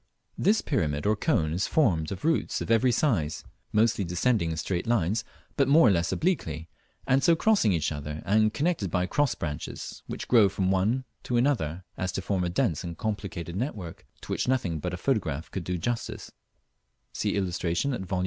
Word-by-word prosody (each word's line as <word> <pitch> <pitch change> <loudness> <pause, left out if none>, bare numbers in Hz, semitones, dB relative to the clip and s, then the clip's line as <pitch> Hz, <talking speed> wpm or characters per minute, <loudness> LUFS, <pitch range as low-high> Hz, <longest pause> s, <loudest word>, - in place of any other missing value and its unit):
This 215 +2 +3
pyramid 75 - -1
or 105 +1 +3
cone 85 - +1
is 90 +3 0
formed 85 - +2
of 100 +8 -5
roots 165 0 +1
of - - -3
every 125 +3 +4
size, 105 - 0 0.3
mostly 110 -1 +2
descending 90 +2 +1
in 80 - -3
straight 90 +6 -2
lines, 110 -2 +1 0.3
but 140 - +3
more 145 -1 +6
or - - +6
less 85 -2 +1
obliquely 80 - -1 0.4
and 135 +1 +3
so 170 -1 +5
crossing 200 - +3
each 80 -4 0
other, 75 +1 -5
and 110 +1 +3
connected 145 - 0
by 90 +1 +1
cross 145 +5 +1
branches, 75 -3 -5
which - - -6
grow 110 -5 +6
from 95 0 0
one 110 +8 +1 0.2
to 120 - -1
another; 95 - 0
as 95 0 -2
to - - -2
form 95 -2 0
a 90 - 0
dense 85 -2 0
and 85 -2 -6
complicated 100 -6 -4
network, 100 - -5
to - - -8
which - - -1
nothing 100 -11 0
but - - -3
a - - -6
photograph 70 +4 -1
could 95 - -4
do 90 +2 -2
justice 115 +7 -3 0.8
(see - - -1
illustration 95 +6 0
at 120 - -3
Vol. 95 0 -2
100 Hz, 190 wpm, -27 LUFS, 85-125 Hz, 0.8 s, more